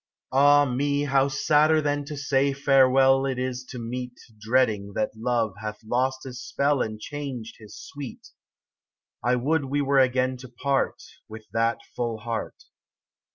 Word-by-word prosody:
27 135 +2 +3
AH 145 0 +6
me, 145 +2 0
how 135 -1 +2
sadder 155 +3 +3
than 145 -1 -1
to 145 +1 -7
say 140 0 +1
farewell 135 -1 +4
It 130 -2 -2
is 125 0 -3
to 125 - -9
meet 125 +1 -6 0.2
Dreading 105 -3 +1
that 110 - 0
Love 115 -2 0
hath 105 0 -5
lost 130 +4 -1
his 125 -1 -8
spell 140 0 0
And 110 -1 -3
changed 135 -4 -6
his 105 -2 -12
sweet! 140 -3 -9 0.9
I 125 +2 +2
would 145 +4 0
we 140 +2 -1
were 140 -1 +3
again 130 0 +2
to 130 0 -11
part, 135 +3 -1 0.3
With 110 0 -10
that 115 +1 +1
full 120 -2 -2
heart. 115 +1 -5
130 Hz, 155 wpm, -25 LUFS, 120-140 Hz, 0.9 s, AH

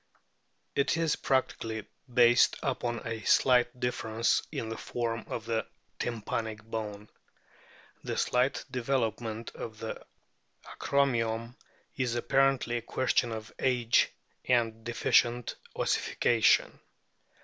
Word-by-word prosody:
It 140 +3 +1
is 165 -2 +2
practically 115 -5 -1 0.3
based 120 0 +5
upon 120 -3 -2
a 115 -1 -4
slight 125 +2 +3
difference 115 -2 +1
in 110 - -4
the 115 - -4
form 115 -1 -3
of 115 - -5
the 115 -1 -1 0.3
tympanic 110 -1 -3
bone. 105 -2 -5 1.0
The - - -3
slight 125 +2 +1
development 115 -3 -2
of 110 -1 -7
the 110 +1 -6 0.6
acromion 115 -4 0 0.4
is 125 -3 -1
apparently 135 0 +2
a - - -3
question 120 0 0
of 110 0 -6
age 120 -3 +3 0.3
and 115 -3 +1
deficient 120 +1 +2 0.2
ossification. 115 -2 +2
120 Hz, 105 wpm, -30 LUFS, 115-125 Hz, 1.0 s, based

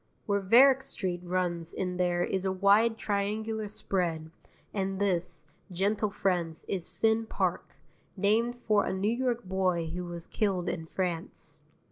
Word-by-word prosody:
Where 200 -1 +1
Varick 255 +7 +6
Street 185 -9 -2
runs 175 -2 -2
in 180 -1 -2
there 175 -1 +1
is 190 +1 -1
a 190 - 0
wide 205 +4 +4
triangular 215 +2 -2
spread, 170 -6 -2 0.4
and 195 -1 -1
this, 175 -5 +1 0.3
gentle 200 +4 0
friends, 175 -5 -1
is 185 -4 -3
Finn 225 0 +1
Park, - - -2 0.4
named 225 +5 +2
for 210 -2 +4
a - - -2
New 200 +5 0
York 245 -2 -1
boy 185 -3 0
who 180 0 -4
was 170 -1 -6
killed 195 -4 -1
in 160 -2 -3
France. 175 -2 -4
190 Hz, 145 wpm, -29 LUFS, 175-215 Hz, 0.4 s, Varick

